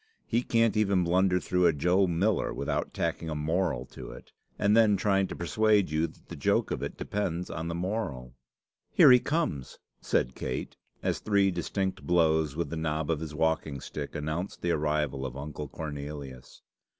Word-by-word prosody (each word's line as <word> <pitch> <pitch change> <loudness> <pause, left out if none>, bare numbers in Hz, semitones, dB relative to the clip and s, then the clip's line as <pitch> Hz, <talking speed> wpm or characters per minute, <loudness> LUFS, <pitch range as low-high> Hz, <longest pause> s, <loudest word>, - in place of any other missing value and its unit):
He 120 +1 +1
cant 115 -3 +2
even 100 -4 +3
blunder 90 +1 +3
through 90 0 +2
a - - +3
Joe 90 +6 +3
Miller 95 +4 +1
without - - -2
tacking 80 - -2
a 75 - -3
moral 75 -3 0
to - - -9
it, - - -12 0.3
and 105 +1 +3
then 110 -3 +5
trying 95 0 +2
to - - -6
persuade 105 0 +2
you 80 +2 +1
that - - -19
the - - -8
joke 70 - +1
of - - -2
it - - -5
depends 90 -4 -3
on 80 0 -4
the 85 - -3
moral." 85 - -3 0.6
"Here - - +7
he 125 - +8
comes!" 145 - -2 0.2
said 65 - 0
Kate, 65 - -4 0.3
as - - 0
three 100 -2 +2
distinct 95 +2 -2
blows 80 -4 +2
with 85 +1 -2
the - - -2
knob 80 0 -1
of 80 - 0
his 75 -1 -6
walking 80 -3 0
stick 70 +3 -6
announced 80 +5 -4
the 85 - +1
arrival 75 -3 0
of 65 0 -5
Uncle 75 +1 -6
Cornelius. 70 -3 -7
85 Hz, 180 wpm, -29 LUFS, 75-95 Hz, 0.6 s, he